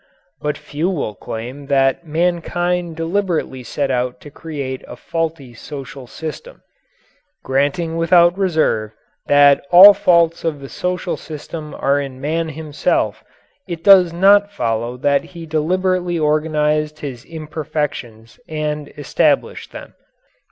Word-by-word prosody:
But 150 -1 -2
few 155 +5 -3
will 145 - -2
claim 125 +7 -7
that 135 +3 +1
mankind 175 +1 -1
deliberately 165 -5 -2
set 135 +2 -2
out 125 0 -1
to 145 - -12
create 140 -4 -6
a - - -9
faulty 160 -6 -4
social 135 +1 -9
system. 160 - -8 0.8
Granting 145 +5 0
without 170 +1 +4
reserve 155 - 0 0.3
that 145 -1 +5
all 190 +4 +10
faults 170 -4 +2
of 160 -3 -2
the 135 -1 -9
social 180 0 -3
system 155 0 -8
are 140 +1 +1
in 135 -2 -7
man 160 +4 -2
himself, 155 -1 -1 0.4
it 170 -2 -6
does 185 -3 +7
not 200 +4 +4
follow 120 - -2
that 140 +2 +1
he 170 -1 -10
deliberately 175 +3 0
organized 150 0 0
his 130 -5 -6
imperfections 150 -8 -5
and 150 -1 -3
established 145 - 0
them. - - -10
155 Hz, 125 wpm, -19 LUFS, 140-170 Hz, 0.8 s, all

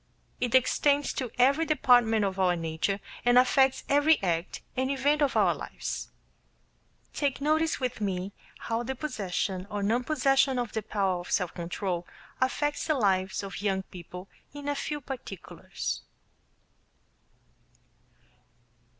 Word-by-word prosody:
It 245 0 +1
extends 285 +3 +3
to 255 -3 -3
every 275 +6 +4
department 245 -8 +4
of 190 -1 -3
our 180 -2 +3
nature 165 +4 -2 0.2
and 245 0 +5
affects 265 +1 +4
every 290 +3 +4
act 170 -1 -2
and 260 +1 0
event 285 +2 +1
of 285 - +2
our - - +4
lives. - - -5 1.0
Take 285 -3 -1
notice 315 +3 +1
with 250 -4 -3
me 195 -1 -2 0.3
how 230 0 -1
the 265 +2 -3
possession 195 -8 -3
or 205 -1 -3
non 230 +5 +1
possession 270 -2 +2
of 240 -3 -2
the 220 - -1
power 195 -3 -1
of 175 - -9
self 180 -3 0
control 175 0 -3 0.3
affects 290 +3 0
the 310 - +2
lives 190 -5 +1
of 195 0 -6
young 195 -2 0
people 180 +1 -10 0.3
in 290 0 -7
a 290 - +1
few 295 +1 -4
particulars. 245 -8 -6
240 Hz, 135 wpm, -28 LUFS, 190-275 Hz, 1.0 s, and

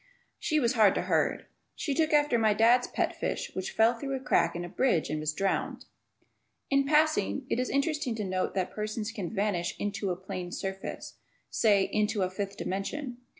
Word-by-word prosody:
She 305 -1 +1
was 235 -4 +2
hard 215 -5 +5
to - - 0
herd. - - +1 0.3
She 290 - -2
took 315 +2 +1
after 295 -5 +3
my 215 -2 +3
dad's 235 +3 +4
pet - - -1
fish - - -3
which 185 - -3
fell 225 +2 +4
through 275 +3 -4
a - - -3
crack 170 -10 +2
in 175 0 -3
a - - -6
bridge 175 - +1
and 155 - -1
was 155 0 -1
drowned. 195 +5 -2 0.9
In 275 0 +3
passing, 300 -4 +2
it - - +1
is 255 - -1
interesting 280 -3 0
to 215 - -3
note 185 -1 -2
that 185 -2 -1
persons 215 +1 -3
can 200 -7 -4
vanish 200 -4 -1
"into" 205 -1 -2
a 180 - 0
plane 180 -1 -6
surface; 195 0 -6 0.3
say, 205 -4 +4
"into" 210 0 0
a 185 - -1
fifth 200 +1 -4
dimension. 245 +7 -4
215 Hz, 195 wpm, -29 LUFS, 190-260 Hz, 0.9 s, hard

